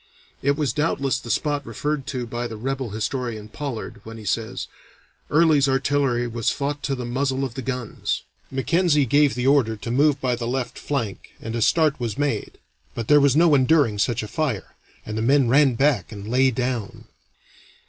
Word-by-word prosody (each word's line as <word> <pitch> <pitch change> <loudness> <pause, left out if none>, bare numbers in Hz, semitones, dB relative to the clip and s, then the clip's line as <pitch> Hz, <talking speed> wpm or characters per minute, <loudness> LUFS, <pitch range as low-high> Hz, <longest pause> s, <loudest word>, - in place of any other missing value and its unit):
It 140 +1 +1
was 145 -7 0
doubtless 140 -3 0
the 120 - -10
spot 145 +3 0
referred 145 0 -3
to 130 -3 -3
by 120 +1 -4
the 110 -2 -7
rebel 130 +1 -3
historian, 110 0 -3
Pollard, 135 -1 -6
when 115 0 -9
he 110 - -10
says, 110 +1 -2 0.6
'Early's 150 -3 +4
artillery 135 -2 +1
was 115 -1 -1
fought 145 +1 -2
to 135 - 0
the 125 -1 -5
muzzle 130 +2 -1
of 125 - -6
the 130 - -5
guns.' 125 -3 -3 0.3
Mackenzie 150 +2 +2
gave 145 +3 +3
the 125 0 -2
order 135 -5 +3
to 110 +2 -6
move 145 +2 +3
by 125 -2 0
the 120 -1 -4
left 125 -1 -3
flank 115 -9 -4
and 115 +1 -5
a 115 - -1
start 155 +3 +3
was 120 -1 -3
made, 140 -7 -2 0.4
but 115 -2 -4
there 150 -1 +7
was 140 -1 +4
no 165 0 +5
enduring 135 -5 +3
such 120 +1 +1
a - - -5
fire, 135 -6 -2 0.3
and 110 0 -4
the - - -1
men 135 +2 +4
ran 135 -1 +4
back 135 - +1
and 100 -1 -8
lay 130 +3 +3
down. 125 -4 -3
130 Hz, 190 wpm, -23 LUFS, 115-145 Hz, 0.6 s, there